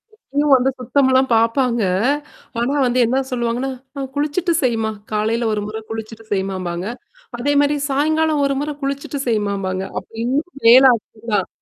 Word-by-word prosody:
இப்பயும் 290 -7 0
வந்து 260 +1 +2
சுத்தம்லாம் 260 +1 +2
பார்ப்பாங்க. 230 +1 +2 0.8
ஆனா 240 +4 0
வந்து 250 0 +1
என்ன 260 +4 +1
சொல்லுவாங்கன்னா, 245 +2 -1 0.3
அ - - -3
குளிச்சுட்டு 305 +5 0
செய்மா 225 -3 +1 0.2
காலையில 225 +2 0
ஒரு 210 - -1
முறை 220 +1 -5
குளிச்சுட்டு 225 0 -7
செய்மாம்பாங்க. 185 -2 -3 0.5
அதே 285 +4 0
மாரி 290 +1 +2
சாயங்காலம் 310 +2 +1
ஒரு 275 - +1
முறை 295 +1 -2
குளிச்சுட்டு 280 +1 -3
செய்மாம்பாங்க. 200 -4 -1 0.2
அப்ப - - -18
இன்னும் 285 +9 -1 0.2
வேல 250 +3 +9
அதிகம் 225 +1 -10
தான். 195 -3 +1
245 Hz, 145 wpm, -19 LUFS, 220-280 Hz, 0.8 s, வேல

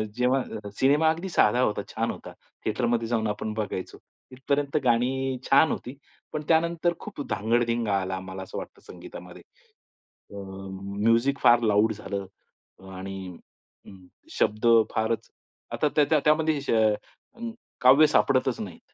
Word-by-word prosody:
जेव्हा 125 -4 -1
सिनेमा 150 +4 +4
अगदी 170 +4 -2
साधा 125 -7 +3
होता, 105 -4 +1
छान - - -2
होता, - - -10 0.3
थिएटर 120 +3 0
मध्ये 115 -1 0
जाऊन 115 -2 0
आपण 105 +1 -3
बघायचो, 105 -4 -4 0.3
इथपर्यंत 140 +3 -1
गाणी 130 +2 +1
छान 145 +3 +5
होती, 130 +3 -5 0.4
पण 155 - -2
त्यानंतर 170 +1 +2
खूप 205 -8 -8
धांगडधिंगा 115 +1 0
आला, 95 0 -3
आम्हाला 95 0 -7
असं 95 - -8
वाटतं - - -8
संगीतामध्ये - - -11 0.9
अ, 100 - -10 0.7
म्युझीक 115 +5 +3
फार 120 0 +6
लाउड 110 +2 +3
झालं 100 -2 -5 0.7
आणि 95 -2 -7 1.0
शब्द 105 +3 +1 0.3
फारच 110 0 -1 0.4
आता 150 - +1
त्याच्या 150 +1 +4
त्यामध्ये 155 0 +3
अ, 110 - -1 0.4
काव्य 135 +5 +7
सापडतच 130 -4 +2
नाहीत. 95 -6 -10
120 Hz, 125 wpm, -26 LUFS, 105-145 Hz, 1.0 s, काव्य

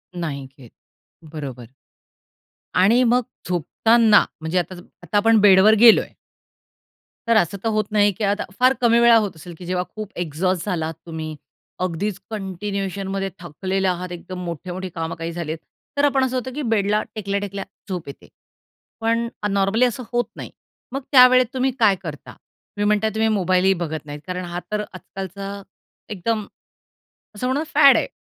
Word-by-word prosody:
नाही 150 -6 -4
घेत, 125 -5 -15 0.6
बरोबर. 130 -6 -7 1.0
आणि 215 +7 +4
मग 245 +1 +3 0.3
झोपताना 215 +6 +4 0.2
म्हणजे 160 +3 0
आता 180 +1 -4
सम 175 - -12 0.2
आता 175 +4 -1
आपण 225 +1 +5
बेडवर 200 +1 +7
गेलो 230 -1 +8
आहे. - - -11 1.1
तर 230 - +4
असं 200 0 +1
तर 225 - +1
होत 215 -1 +1
नाही, 205 -1 +4
की 220 - -3
आता 205 +1 +1 0.2
फार 255 +1 +5
कमी 235 0 +4
वेळा 235 0 +7
होत 205 -4 0
असेल, 170 +2 -10
की 180 - -10
जेव्हा 180 0 -1
खूप 215 -1 -6
एक्झॉस्ट 175 +2 -1
झाला 175 -6 -1
आहात 160 - -4
तुम्ही, 160 -1 -6 0.4
अगदीच 185 +3 -2
कंटिन्यूएशनमध्ये 195 -1 -3
थकलेले 190 +3 -2
आहात, 180 0 -2
एकदम 180 +1 -7
मोठे-मोठे 180 +3 -5
कामं 165 0 -3
काही 165 0 -5
झालेत, 165 -2 -4 0.4
तर 285 - +4
आपण 270 -2 +2
असं 260 0 -3
होतं 255 +1 -4
की 300 - -3
बेडला 210 0 +2
टेकल्या-टेकल्या 200 -1 -3 0.3
झोप 180 -5 -4
येते. 140 - -11 0.7
पण 230 +1 +1 0.2
अ - - +2
नॉर्मली 200 +4 +2
असं 250 +1 -2
होत 240 0 +1
नाही. - - -8 0.4
मग 275 +2 -3
त्यावेळेत 255 -1 +7
तुम्ही 260 0 +1
काय 215 -4 +5
करता? 150 -4 -7
तुम्ही 205 0 -8
म्हणता 210 +1 +2
तुम्ही 220 0 +2
मोबाईलही 190 -2 +3
बघत 160 -4 -4
नाहीत 145 0 -7
कारण 180 0 -4
हा 175 0 -4
तर 210 0 0
आजकालचा 195 +2 -7 0.5
एकदम 215 +2 -2 0.9
असं 250 +5 -2
म्हणू 260 +3 0
ना - - -1
फॅड - - +7
आहे - - 0
195 Hz, 165 wpm, -22 LUFS, 175-220 Hz, 1.1 s, गेलो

